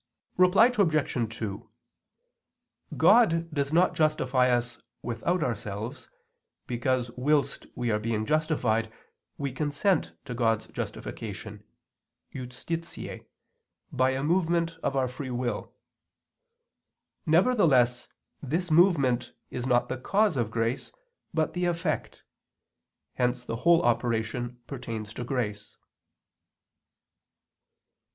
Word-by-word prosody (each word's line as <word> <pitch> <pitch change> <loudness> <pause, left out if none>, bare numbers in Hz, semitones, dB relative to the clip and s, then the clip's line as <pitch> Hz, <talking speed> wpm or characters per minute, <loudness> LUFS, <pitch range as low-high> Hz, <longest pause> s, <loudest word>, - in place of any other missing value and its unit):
Reply 185 +7 +6
Obj. 150 - +1
2: 100 -3 -5 1.3
God 165 -8 +4
does 140 -1 -1
not 175 +3 +4
justify 135 -5 +2
us 120 -1 -1 0.2
without 125 +10 -1
ourselves, 115 +3 -4 0.6
because 125 0 -1
whilst 140 +4 0
we 120 -1 -1
are 105 - +1
being 110 0 -1
justified 125 -7 +1 0.5
we 140 -2 -2
consent 150 +6 0
to 125 - -5
God's 115 -2 +1
justification - - -6 0.7
(justitiae) 135 +7 -6 0.6
by 130 0 +2
a 130 +1 -1
movement 170 0 +1
of 135 - -1
our 130 -1 +2
free 130 +2 -6
will. 120 -3 -3 1.6
Nevertheless 155 - +3 0.3
this 165 +5 -2
movement 140 -8 +3 0.2
is 125 0 -3
not 120 -1 +3
the 130 - -4
cause 200 +5 +2
of 120 -5 0
grace, 115 +2 -2 0.4
but 160 -1 0
the 180 0 -1
effect; 170 -1 -2 0.9
hence 125 0 0
the 115 - -3
whole 170 +6 +4
operation 120 +1 -1
pertains 115 -5 -6
to 125 - -5
grace. 110 -5 -3
130 Hz, 100 wpm, -28 LUFS, 120-160 Hz, 1.6 s, Reply